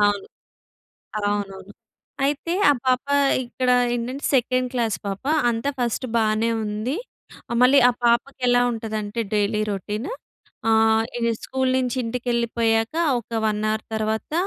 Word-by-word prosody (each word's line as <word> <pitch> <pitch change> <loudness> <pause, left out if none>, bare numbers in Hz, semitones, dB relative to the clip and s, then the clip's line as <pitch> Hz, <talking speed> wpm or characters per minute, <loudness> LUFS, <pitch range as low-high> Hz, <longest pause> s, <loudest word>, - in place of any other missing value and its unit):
అవును. 205 -1 +2 0.9
అవునవును. 205 -1 -3 0.5
అయితే 290 +4 -1 0.2
ఆ - - +6
పాప 255 +1 +2 0.4
ఇక్కడ 250 +1 -1 0.2
ఏంటంటే, 250 +4 -4
సెకండ్ 255 0 +2
క్లాస్ 230 -4 0
పాప. 195 0 -4 0.3
అంతా 230 +4 -1
ఫస్ట్ 245 +1 -1
బానే 220 +1 +2
ఉంది. 215 +7 -2 0.5
ఆహ్, 235 - -1
మళ్ళీ 270 +3 +6
ఆ - - +5
పాపకి 235 +3 +2
ఎలా 245 0 +4
ఉంటదంటే, 220 -1 -4
డైలీ 210 +1 +1
రొటీన్ 210 - -4 0.6
ఆహ్, 220 0 +4 0.4
స్కూల్ 260 -1 0
నుంచి 250 -1 -1
ఇంటికెళ్ళిపోయాక 235 0 0 0.3
ఒక 230 0 -4
1 210 0 -1
అవర్ 215 0 -2
తర్వాత 220 +4 -2
230 Hz, 125 wpm, -23 LUFS, 215-250 Hz, 0.9 s, ఆ